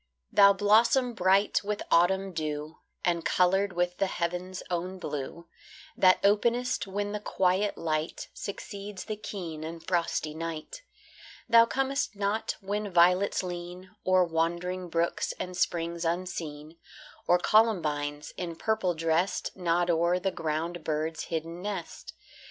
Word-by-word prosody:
Thou 200 0 +7
blossom 225 +5 +4
bright 195 +1 +3
with 210 0 -3
autumn 190 +3 +3
dew, 155 -1 -4 0.3
And 170 -1 +1
coloured 190 +2 +2
with 175 0 -1
the 195 - +2
heaven's 180 +1 -3
own 180 +2 -2
blue, 165 0 -5 0.5
That 185 -1 +5
openest 235 +4 +2
when 205 +1 -2
the 210 - -3
quiet 190 0 +1
light 155 -1 -2
Succeeds 200 0 -7
the 215 - -3
keen 175 -7 -6
and 165 +1 -7
frosty 170 -3 0
night. 165 - -6 0.7
Thou 230 -1 +7
comest 270 -1 -1
not 200 +2 -1
when 205 +1 -3
violets 180 +3 +4
lean 180 +1 -7
O'er 185 0 +4
wandering 175 +2 -1
brooks 170 +1 0
and 180 0 -4
springs 170 -1 -1
unseen, 165 -3 -4 0.5
Or 175 - +6
columbines, 155 -9 +1
in 170 -2 -4
purple 195 -2 0
dressed, 165 +3 0
Nod 175 -1 +1
o'er 170 +2 +2
the 190 +1 -1
ground 160 +1 -3
bird's 155 +1 -2
hidden 165 +1 -4
nest. 195 -4 -6
180 Hz, 130 wpm, -28 LUFS, 165-200 Hz, 0.7 s, Thou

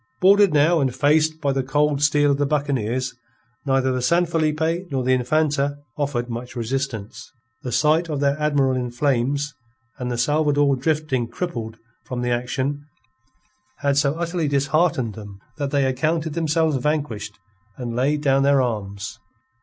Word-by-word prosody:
Boarded 200 0 +5
now 155 +3 +4
and 130 -3 0
faced 155 +3 +2
by 140 -3 +1
the 135 - 0
cold 145 +2 +1
steel 145 0 +3
of 140 - 0
the 145 - +2
buccaneers, 130 -4 -1 0.5
neither 135 -1 +2
the 130 0 -1
San 170 +8 +3
Felipe 165 +2 -1
nor 130 -2 -1
the 130 +1 +2
Infanta 145 +2 +1 0.2
offered 140 -5 -2
much 120 +1 -6
resistance. 120 -3 -4 0.3
The 125 - -5
sight 160 +5 +2
of 150 -2 -2
their 140 0 +2
admiral 145 -3 +2
in 125 -1 -2
flames, 140 +3 0 0.5
and 125 -1 -3
the 120 - -2
Salvador 145 +1 +2
drifting 140 -3 -1
crippled 115 -8 -5 0.3
from 125 -1 -4
the 125 - 0
action, 130 +4 -2 1.0
had 140 -1 +2
so 140 +1 +2
utterly 170 -1 -2
disheartened 140 -3 +1
them 105 -2 -10 0.2
that 140 -1 -1
they 140 -1 +1
accounted 155 +5 0
themselves 160 -1 +1
vanquished, 125 -7 -2 0.4
and 120 -2 -5
laid 145 +4 +1
down 135 -2 +3
their 140 0 +4
arms. 105 -2 -3
140 Hz, 155 wpm, -22 LUFS, 125-150 Hz, 1.0 s, Boarded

